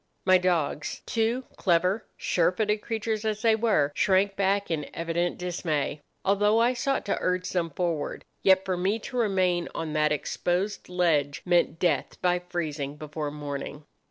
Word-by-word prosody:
My 185 -1 +6
dogs—two 185 - 0
clever, 185 +3 +1
sure 175 -1 +2
footed 210 +2 0
creatures 220 -1 -2
as 215 -1 -2
they 225 -1 +5
were—shrank 195 -1 +2
back 200 -1 +1
in 150 -3 -2
evident 170 +1 -1
dismay, 160 -5 -2 0.2
although 205 +2 +3
I 240 +2 +4
sought 275 +2 -1
to 200 - -1
urge 180 0 0
them 170 -2 0
forward; 165 -2 -2 0.2
yet 190 0 +4
for 185 - 0
me 190 +5 0
to 250 +3 -9
remain 185 -6 +1
on 160 -2 -3
that 150 0 +2
exposed 180 +7 -1
ledge 160 -6 +1
meant 175 -2 +2
death 165 -6 0
by 180 0 +2
freezing 155 -5 -4
before 150 0 -5
morning. 145 0 -6
180 Hz, 150 wpm, -27 LUFS, 160-205 Hz, 0.2 s, My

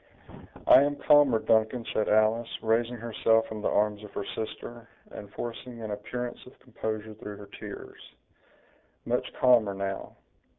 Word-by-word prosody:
"I - - +8
am 145 +1 +1
calmer, 145 -5 +5
Duncan," 110 +2 +1
said 110 - 0
Alice, 110 +2 +3
raising 115 +2 +1
herself 115 -1 +2
from 110 -1 -7
the - - 0
arms 105 0 +1
of 105 - -10
her 100 - -3
sister, 115 +1 -7 0.2
and 100 -1 -9
forcing 120 0 -6
an 110 -2 -5
appearance 125 +4 -5
of 125 - -15
composure 110 -3 -5
through 105 -2 -9
her 100 - -10
tears; - - -9 1.0
"much - - -1
calmer, 115 -6 +4
now. 95 0 -4
110 Hz, 145 wpm, -28 LUFS, 105-120 Hz, 1.0 s, I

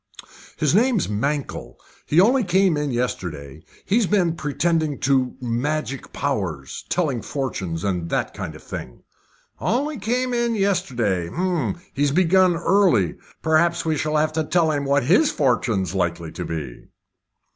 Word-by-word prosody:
"His 150 -1 +1
name's 230 -1 +3
Mankell. 140 +7 -3 0.3
He 155 - +3
only 245 +7 +5
came 185 -2 +3
in 150 -1 -1
yesterday. 80 - -3 0.2
He's 215 0 +2
been 180 -5 +2
pretending 155 -1 0
to 130 -2 +1
magic 135 +3 -2
powers 95 - -3
telling 145 -10 0
fortunes, 95 - -4
and 90 -4 -1
that - - -1
kind - - -6
of - - -13
thing." 60 - -8 0.6
"Only 280 +4 -1
came 245 +5 -1
in 235 -1 +1
yesterday? 125 - 0 0.6
He's 145 +1 +1
begun 185 +3 +4
early. 170 - +3 0.3
Perhaps 170 +2 +2
we 160 -1 +1
shall 155 +1 0
have 155 +1 +1
to 160 0 0
tell 160 0 +2
him 145 -2 -1
what 140 0 +2
his 195 - +4
fortune's 115 - 0
likely 85 -3 -2
to - - -5
be." 75 -7 -6
150 Hz, 140 wpm, -22 LUFS, 115-180 Hz, 0.6 s, only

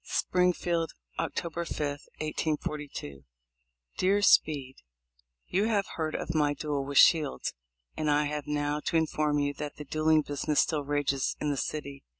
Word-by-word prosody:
Springfield, 175 -2 +1 0.3
October 170 0 -2
5, 170 - -6 0.4
1842. 150 - -3 0.8
Dear 200 +2 +3
Speed: 140 -8 +3 0.4
— - - -41
You 195 +4 +3
have 210 -3 +1
heard 155 -1 -2
of - - -3
my 145 -2 +2
duel 145 -1 -2
with 140 0 -3
Shields, 155 -5 +4 0.4
and 155 -1 -1
I 150 0 +3
have 150 -1 -3
now 145 0 0
to 165 - +2
in 160 - +3
form 150 -1 0
you 145 0 0
that 145 0 -6
the 150 - -8
duelling 155 +1 +3
business 145 +1 -1
still 150 -3 0
rages 140 -2 0
in 150 - 0
this 140 - -1
city. 140 -2 -6
150 Hz, 155 wpm, -29 LUFS, 145-160 Hz, 0.8 s, Shields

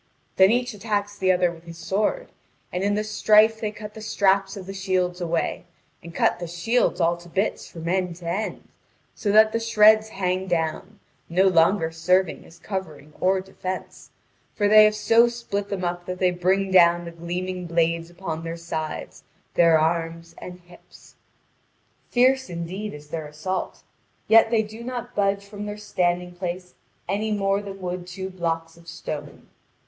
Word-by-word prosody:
Then 190 0 +7
each 245 +1 +1
attacks 205 -1 -2
the 190 -2 +2
other 180 -1 +2
with 165 0 -14
his 165 -1 -10
sword, 210 - -1 0.4
and 180 +1 -1
in 205 0 +1
the 210 - 0
strife 215 +1 +4
they 215 - -1
cut 210 0 -9
the 220 - -10
straps 195 -1 +1
of 190 - -8
the 195 - -7
shields 185 -2 -1
away, 170 0 -2 0.4
and 170 - -10
cut 165 - +1
the 175 - -5
shields 175 +10 0
all 170 0 +2
to 175 0 -14
bits 195 +5 -1
from 165 -1 -8
end 180 -1 0
to 175 0 -13
end, 195 +6 -3 0.5
so 205 - -1
that 215 +1 +6
the 230 - 0
shreds 220 -1 +5
hang 185 -2 -2
down, 175 +4 -2 0.3
no 185 +3 +3
longer 165 -1 +3
serving 180 +2 +1
as 165 - -16
covering 160 -7 -6
or 190 +1 +2
defence; 185 0 -7 0.5
for 205 - +2
they 215 +1 +8
have 215 0 +2
so 225 +3 +4
split 235 -4 -4
them 195 -2 -3
up 175 0 -3
that 180 0 -4
they 185 -1 +2
bring 190 +2 0
down 175 -1 +5
the 170 - -7
gleaming 180 +2 -4
blades 165 0 0
upon 175 -2 -5
their 165 0 -5
sides, 160 -2 -5 0.3
their 165 -2 +5
arms, 165 +1 -1
and 180 0 -9
hips. 175 0 -18 1.0
Fierce, 260 +2 +3
indeed, 180 +3 -5
is 150 0 -13
their 160 -1 -5
assault; 170 +5 -4 0.4
yet 225 0 +6
they 225 -1 +2
do 220 +2 -10
not 245 0 -5
budge 200 0 0
from 205 +1 -7
their 205 0 -5
standing 180 -4 -1
place 180 0 -5 0.3
any 210 +4 -1
more 195 -1 +1
than 195 -1 -8
would 180 -1 -5
two 190 +1 -6
blocks 165 -2 -3
of 170 0 -19
stone. - - -7
185 Hz, 175 wpm, -24 LUFS, 170-210 Hz, 1.0 s, they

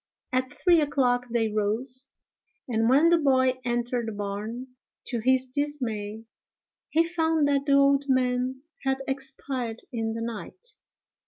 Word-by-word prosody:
At 255 0 0
three 345 -3 +3
o'clock 250 -4 +1
they 230 -1 +1
rose, 230 +6 -1 0.6
and 225 -2 +1
when 290 +6 +6
the 340 -1 +5
boy 260 -3 +3
entered 240 -1 -1
the - - -2
barn, 210 +5 -5 0.4
to 240 - -2
his 260 +3 +3
dismay, 245 -6 -3 0.7
he 330 - +4
found 320 -3 +1
that 280 0 +1
the 280 - +4
old 280 0 +4
man 255 0 +1 0.2
had 270 0 0
expired 265 -3 -4
in 225 -1 -1
the 230 - -4
night. 235 - -6
255 Hz, 140 wpm, -27 LUFS, 235-280 Hz, 0.7 s, when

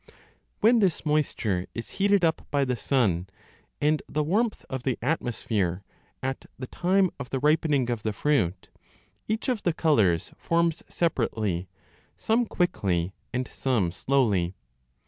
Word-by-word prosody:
When 230 +2 +6
this 190 -7 +1
moisture 120 -11 0
is 115 - -5
heated 200 -2 +4
up 160 - -1
by 140 -1 +2
the 125 -1 0
sun 105 -10 +1 0.5
and 150 +1 +2
the 150 - 0
warmth 210 +9 0
of 130 -1 -4
the 130 -1 -1
atmosphere 110 - -1 0.4
at 135 0 -3
the 130 - -5
time 185 +6 +2
of 140 - -6
the 135 - -1
ripening 150 -2 +2
of 115 -3 -2
the 110 - -1
fruit, 105 - 0 0.6
each 220 +1 -1
of 245 -5 0
the 175 - +1
colours 105 - +2
forms 170 -1 +1
separately, 110 - -1 0.5
some 230 +1 +1
quickly 95 - 0 0.2
and 125 0 -2
some 115 -10 0
slowly. 100 -6 +1
135 Hz, 140 wpm, -27 LUFS, 105-165 Hz, 0.6 s, When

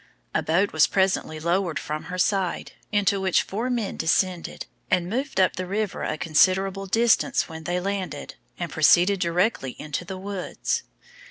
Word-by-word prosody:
A - - +1
boat 175 +6 +1
was 155 -3 +5
presently 190 -5 0
lowered 170 0 0
from 155 0 -4
her 180 - -5
side, 190 -1 0 0.2
into 200 -1 +2
which 190 -2 +2
four 225 +6 -3
men 235 -5 -2
descended, 175 +2 0 0.2
and 175 -1 +1
moved 255 +3 -2
up 185 - +3
the 185 0 -3
river 200 0 -2
a - - -2
considerable 190 +5 +2
distance, 235 +6 +2
when 160 -1 -9
they 175 +2 0
landed, 195 0 -4 0.2
and 170 -3 -4
proceeded 175 +6 +4
directly 170 - 0
into 150 +3 -4
the 190 +2 -7
woods. 195 -1 -3
185 Hz, 160 wpm, -25 LUFS, 170-200 Hz, 0.2 s, was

